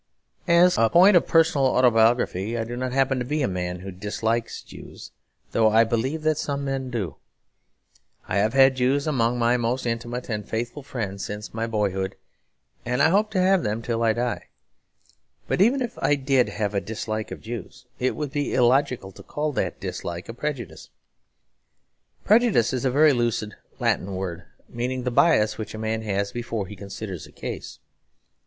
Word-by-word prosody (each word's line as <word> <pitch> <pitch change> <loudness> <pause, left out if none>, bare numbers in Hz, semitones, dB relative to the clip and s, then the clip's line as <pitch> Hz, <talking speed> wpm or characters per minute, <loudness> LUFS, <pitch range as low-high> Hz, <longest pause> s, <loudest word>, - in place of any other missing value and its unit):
As 170 -4 +5
a 115 0 +4
point 185 - +6
of 175 - +4
personal 160 -5 +4
autobiography, 115 -4 +2
I 115 - -1
do 120 +2 -6
not 130 +1 -3
happen 135 0 +1
to - - -1
be 145 +4 -1
a - - +2
man 90 -1 -3
who 95 +1 -7
dislikes 110 +4 -2
Jews; - - -12 0.4
though 110 -1 +4
I 110 +1 +5
believe 125 +7 -1
that 155 -1 +1
some 140 -1 -2
men 135 -1 -3
do. 105 - -4 1.1
I - - -1
have 105 +2 +2
had 135 -1 +5
Jews 135 +3 +1
among 125 -5 +1
my 120 +1 +3
most 120 +2 -1
intimate 120 +1 -3
and 105 -3 -4
faithful 120 +5 -3
friends 110 -8 -5
since 105 +1 -6
my 115 +1 -2
boyhood, 100 -3 -1 0.7
and 125 +2 -1
I 150 +3 +5
hope 205 +4 +2
to 190 - +1
have 190 +1 +4
them 110 0 -2
till 115 -1 -2
I 115 -1 +3
die. 120 +1 -3 1.0
But - - 0
even 255 +6 +4
if 240 0 -6
I 145 - +3
did 135 -2 +2
have 105 -1 -2
a 100 - 0
dislike 110 +1 -4
of - - -7
Jews, 115 0 -8
it 130 0 0
would 150 -3 -4
be 145 0 -2
illogical 125 -4 +2
to - - -14
call 150 +1 -3
that 95 - -2
dislike 85 0 -5
a 115 - -6
prejudice. 135 0 -5 1.4
Prejudice 215 - +4
is 130 +1 -2
a - - +3
very 145 +3 +5
lucid 120 -3 -1 0.3
Latin 95 +1 0
word 90 -2 -5 0.2
meaning 125 +2 -3
the 125 - -1
bias 120 -7 +3
which 110 - -6
a - - -6
man 110 0 -2
has 100 -2 -2
before 115 -4 -3
he 105 - -9
considers 100 -2 -7
a - - -17
case. - - -7
120 Hz, 180 wpm, -24 LUFS, 110-135 Hz, 1.4 s, point